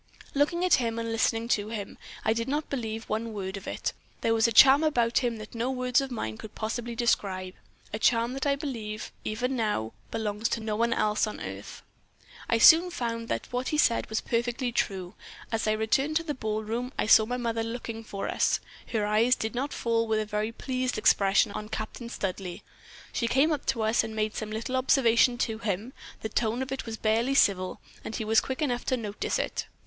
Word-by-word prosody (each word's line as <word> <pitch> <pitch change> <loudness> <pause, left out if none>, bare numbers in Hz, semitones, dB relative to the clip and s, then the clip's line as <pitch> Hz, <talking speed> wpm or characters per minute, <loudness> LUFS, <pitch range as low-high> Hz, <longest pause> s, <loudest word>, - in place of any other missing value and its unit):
"Looking 340 +5 +2
at 365 - +3
him 230 -1 -1
and 230 0 -2
listening 225 0 +1
to 210 -2 +1
him, 210 -3 -5 0.3
I 220 - +4
did 230 0 -2
not 295 +3 -2
believe 225 -4 -3
one 225 +1 -3
word 190 -2 -4
of 195 - -8
it. - - -2 0.3
There 225 - +2
was 225 0 +4
a - - 0
charm 270 +6 +8
about 240 -7 +2
him 240 -3 -1
that 215 0 -10
no 235 +2 -1
words 255 0 +1
of 270 - -4
mine 110 - -4
could 215 - -10
possibly 235 +2 -3
describe 190 -5 0 0.4
a 215 - -2
charm 235 +1 +2
that 270 +2 -2
I 280 - +3
believe, 230 -7 -5
even 250 +5 -2
now, 210 - -1 0.2
belongs 215 0 -2
to - - -1
no 220 -1 -2
one 235 +2 +1
else 215 -1 +1
on 215 - -6
earth. - - -8 0.7
I 230 - +3
soon 330 +9 +8
found 230 -8 -3
that - - -4
what 250 +1 -1
he 305 - 0
said 235 -6 +2
was 220 - -1
perfectly 240 +1 -1
true. 190 -4 -2 0.4
As 225 -1 -1
I 215 - +3
returned 250 +8 +1
to 330 - +2
the 305 -3 -3
ball 220 -4 -3
room 235 +4 -3
I - - +1
saw 220 0 +6
my 250 +1 -2
mother 230 -2 -1
looking 230 -1 -5
for 200 -2 -5
us. - - +1 0.3
Her 215 -3 -1
eyes 220 +4 +3
did 220 - -3
not 270 +4 -2
fall 230 -1 0
with 220 -1 +1
a 215 - -1
very 210 +1 -2
pleased 255 +1 -2
expression 200 -1 +4
on 210 +1 -6
Captain 220 +2 -5
Studleigh. 185 -5 -4 0.5
She 235 - 0
came 270 +7 +3
up 295 -3 -2
to 235 -4 +1
us 220 +2 +3
and 220 - -6
made 215 0 0
some 215 - -4
little 225 +4 -2
observation 245 -2 +4
to 220 -2 -1
him; 220 +3 -3 0.3
the - - -2
tone 230 +3 0
of 265 - -8
it 270 -2 -4
was 225 0 -4
barely 230 +5 +1
civil, 185 -7 +2 0.2
and 220 - -5
he 220 - -3
was 220 +1 +4
quick 265 +4 -3
enough 245 -4 -1
to 255 - +1
notice 210 -3 -2
it. - - -3
230 Hz, 215 wpm, -28 LUFS, 215-250 Hz, 0.7 s, charm